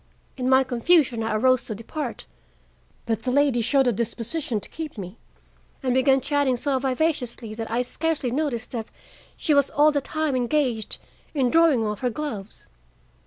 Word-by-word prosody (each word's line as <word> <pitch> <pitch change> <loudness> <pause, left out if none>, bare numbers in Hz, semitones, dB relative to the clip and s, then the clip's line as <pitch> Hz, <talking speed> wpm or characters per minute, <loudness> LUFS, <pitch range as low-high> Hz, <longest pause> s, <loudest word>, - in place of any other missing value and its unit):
In 255 -1 -1
my 265 0 +6
confusion 255 0 +2
I 220 -1 -1
arose 255 +3 +3
to 215 - -5
depart, 245 +4 -5 0.8
but 225 -2 -1
the 255 - -2
lady 275 -2 +3
showed 270 +4 +3
a 245 - +3
disposition 235 +3 -2
to - - -7
keep 315 -6 -7
me, 190 +2 -8 0.6
and 255 -2 +1
began 265 +1 +4
chatting 285 -2 +1
so 270 +1 0
vivaciously 255 -4 -1
that 225 0 -5
I 235 +2 0
scarcely 305 -1 -2
noticed 255 -4 -2
that 225 -3 -4 0.5
she 305 - +1
was 280 -1 +4
all 300 +1 +4
the 285 -1 0
time 310 0 -1
engaged 245 -3 0 0.4
in 255 -4 +2
drawing 320 -9 +4
off 210 -1 -3
her 250 - 0
gloves. 225 -6 -6
255 Hz, 165 wpm, -24 LUFS, 230-290 Hz, 0.8 s, my